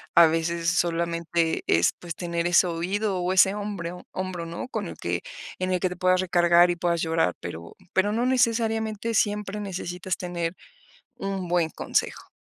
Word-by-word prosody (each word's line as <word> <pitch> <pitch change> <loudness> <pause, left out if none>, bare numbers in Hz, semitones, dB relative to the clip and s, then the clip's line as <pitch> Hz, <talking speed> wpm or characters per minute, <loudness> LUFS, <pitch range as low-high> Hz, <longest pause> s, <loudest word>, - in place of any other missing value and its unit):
A 170 -1 +9
veces 165 +1 0
solamente 170 -1 0
es, 85 +1 +4
pues, 170 -2 -6
tener 170 -1 -2
ese 175 +1 +5
oído 190 +4 -1
o 180 +1 0
ese 190 +1 +5
hombre 200 -5 -4 0.2
hombro, 185 -3 -4
¿no? 170 +8 -6
Con - - -3
el - - -8
que - - -2 0.4
en 185 0 -1
el 180 - +1
que 185 - +2
te 180 - -6
puedas 185 0 +3
recargar, 175 -1 +5
y - - -1
puedas 170 -1 0
llorar, 165 - +1
pero 85 -1 -7 0.2
pero 195 +2 +2
no 235 +3 +1
necesariamente 230 -3 +1
siempre 210 -1 0
necesitas 180 -2 -4
tener 175 -2 -3 0.6
un 195 -2 -4
buen 175 -2 +2
consejo. - - -2
180 Hz, 170 wpm, -25 LUFS, 170-195 Hz, 0.6 s, A